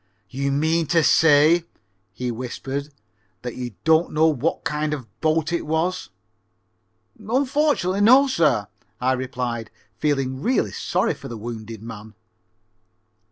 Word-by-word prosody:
"You 140 Hz, +1 st, -1 dB
mean 160 Hz, +3 st, +1 dB
to 165 Hz, 0 st, +3 dB
say," 160 Hz, +2 st, +5 dB, 0.5 s
he 125 Hz, -1 st, -4 dB
whispered, 135 Hz, +4 st, -5 dB, 0.5 s
"that 125 Hz, -1 st, -5 dB
you 120 Hz, -4 st, -6 dB
don't 160 Hz, +1 st, +3 dB
know 155 Hz, +1 st, +3 dB
what 155 Hz, 0 st, 0 dB
kind 150 Hz, -1 st, -1 dB
of 140 Hz, -, -7 dB
a -, -, -25 dB
boat 160 Hz, +1 st, +1 dB
it 170 Hz, -, 0 dB
was?" 165 Hz, +4 st, -1 dB, 1.1 s
"Unfortunately 255 Hz, -3 st, +1 dB
no, 255 Hz, +6 st, +7 dB
sir," 155 Hz, -, +2 dB, 0.3 s
I 130 Hz, +1 st, +1 dB
replied, 125 Hz, -3 st, -3 dB, 0.3 s
feeling 135 Hz, -3 st, -1 dB
really 235 Hz, -, +1 dB
sorry -, -, 0 dB
for -, -, -10 dB
the 115 Hz, -, -7 dB
wounded 110 Hz, -1 st, -7 dB
man. 110 Hz, -1 st, -10 dB
150 Hz, 130 wpm, -23 LUFS, 125-165 Hz, 1.1 s, no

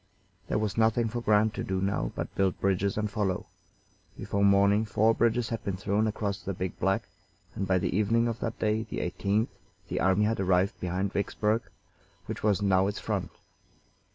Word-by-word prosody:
There -, -, 0 dB
was 110 Hz, +1 st, -1 dB
nothing 115 Hz, +1 st, +3 dB
for 120 Hz, +2 st, -3 dB
Grant 105 Hz, -1 st, +3 dB
to -, -, -4 dB
do 95 Hz, 0 st, -2 dB
now 95 Hz, -11 st, -1 dB
but -, -, -4 dB
build 95 Hz, -2 st, 0 dB
bridges 100 Hz, +1 st, +1 dB
and 105 Hz, 0 st, 0 dB
follow. 100 Hz, -3 st, -1 dB, 0.7 s
Before 100 Hz, 0 st, -1 dB
morning 100 Hz, +1 st, +5 dB
four 110 Hz, +1 st, +3 dB
bridges 115 Hz, +1 st, +1 dB
had 115 Hz, -2 st, -4 dB
been 100 Hz, -3 st, -2 dB
thrown 100 Hz, +3 st, +1 dB
across 100 Hz, -3 st, -2 dB
the 100 Hz, -, -4 dB
Big 95 Hz, 0 st, -4 dB
Black, 95 Hz, +2 st, 0 dB, 0.5 s
and 95 Hz, -, -3 dB
by 95 Hz, 0 st, +3 dB
the 90 Hz, -, -1 dB
evening 115 Hz, +3 st, +2 dB
of 115 Hz, 0 st, -3 dB
that 115 Hz, -1 st, -3 dB
day, 110 Hz, 0 st, +1 dB
the -, -, -4 dB
18th, 100 Hz, +5 st, 0 dB, 0.4 s
the -, -, -1 dB
army 95 Hz, +3 st, +3 dB
had 110 Hz, 0 st, 0 dB
arrived 95 Hz, 0 st, +2 dB
behind 90 Hz, +2 st, -2 dB
Vicksburg, 105 Hz, +2 st, 0 dB, 0.6 s
which 110 Hz, +2 st, -5 dB
was 105 Hz, -1 st, +2 dB
now 95 Hz, -1 st, +3 dB
its 100 Hz, -, -3 dB
front. -, -, -2 dB
100 Hz, 185 wpm, -28 LUFS, 95-110 Hz, 0.7 s, morning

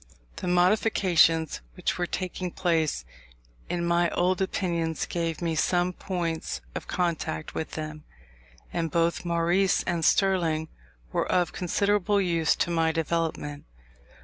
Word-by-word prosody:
The -, -, -4 dB
modifications 180 Hz, -3 st, +3 dB
which -, -, -2 dB
were 175 Hz, -, 0 dB
taking 185 Hz, 0 st, -3 dB
place 160 Hz, -, 0 dB, 0.6 s
in 175 Hz, -1 st, -1 dB
my 170 Hz, 0 st, +3 dB
old 180 Hz, +1 st, +1 dB
opinions 170 Hz, -4 st, -1 dB
gave 165 Hz, -1 st, -3 dB
me 165 Hz, -1 st, 0 dB
some 175 Hz, +3 st, +1 dB
points 170 Hz, -4 st, -3 dB
of -, -, -6 dB
contact 165 Hz, -, -2 dB
with 160 Hz, -, -4 dB
them; 155 Hz, -1 st, -5 dB, 0.7 s
and 165 Hz, -1 st, -1 dB
both 170 Hz, +1 st, +1 dB
Maurice 175 Hz, +3 st, +2 dB
and 170 Hz, -2 st, -1 dB
Sterling 165 Hz, -6 st, +2 dB, 0.4 s
were -, -, 0 dB
of 180 Hz, -2 st, +2 dB
considerable 200 Hz, +2 st, +1 dB
use 170 Hz, -4 st, +2 dB
to 175 Hz, -, 0 dB
my 165 Hz, -1 st, +2 dB
development. 160 Hz, -3 st, -2 dB
170 Hz, 125 wpm, -27 LUFS, 160-180 Hz, 0.7 s, modifications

